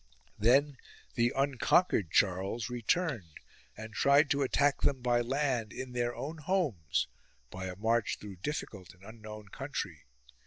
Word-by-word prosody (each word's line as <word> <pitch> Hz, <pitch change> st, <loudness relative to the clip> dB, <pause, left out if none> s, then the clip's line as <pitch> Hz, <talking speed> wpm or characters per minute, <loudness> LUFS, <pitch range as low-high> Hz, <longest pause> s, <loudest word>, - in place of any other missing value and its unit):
Then 135 Hz, +6 st, +4 dB, 0.4 s
the 120 Hz, 0 st, +2 dB
unconquered 135 Hz, -, +2 dB
Charles 100 Hz, +7 st, +1 dB
returned 120 Hz, -, -1 dB, 0.4 s
and 110 Hz, 0 st, -8 dB
tried 140 Hz, +6 st, +4 dB
to 140 Hz, -, +2 dB
attack 140 Hz, +1 st, +2 dB
them 135 Hz, -2 st, +2 dB
by 120 Hz, -1 st, +3 dB
land 125 Hz, -3 st, 0 dB
in 130 Hz, 0 st, -6 dB
their 120 Hz, 0 st, -1 dB
own 155 Hz, +4 st, -5 dB
homes, 150 Hz, -, 0 dB, 0.4 s
by 95 Hz, +1 st, -6 dB
a 90 Hz, -, -5 dB
march 110 Hz, +2 st, +1 dB
through 100 Hz, -3 st, -9 dB
difficult 95 Hz, -, -5 dB
and 90 Hz, -, -23 dB
unknown 110 Hz, -1 st, -10 dB
country. -, -, -5 dB
120 Hz, 140 wpm, -31 LUFS, 105-140 Hz, 0.4 s, Then